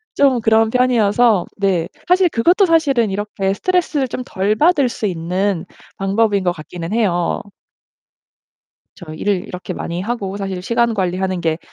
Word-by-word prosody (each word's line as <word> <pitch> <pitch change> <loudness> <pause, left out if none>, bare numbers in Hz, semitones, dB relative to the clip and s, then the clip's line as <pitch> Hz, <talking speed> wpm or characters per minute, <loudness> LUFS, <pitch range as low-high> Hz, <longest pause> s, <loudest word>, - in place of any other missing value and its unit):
좀 265 -4 +3
그런 220 0 +3
편이어서 235 -5 +3
네. 190 -4 0 0.2
사실 360 0 +4
그것도 350 - +3
사실은 280 - +2
이렇게 195 -1 -2
스트레스를 330 - 0
좀 250 +1 -5
덜 205 0 0
받을 295 -3 +3
수 220 - -4
있는 180 +1 -2 0.3
방법인 200 0 +1
것 175 -1 +1
같기는 165 +3 -8
해요. 180 -7 0 1.5
저 165 -5 -10
일을 190 +3 -1
이렇게 180 0 -6
많이 170 +1 -4
하고 200 -3 -3
사실 195 -2 -4
시간 235 +2 +1
관리하는 185 -1 -1
게 160 -1 -1
205 Hz, 300 characters per minute, -18 LUFS, 185-245 Hz, 1.5 s, 사실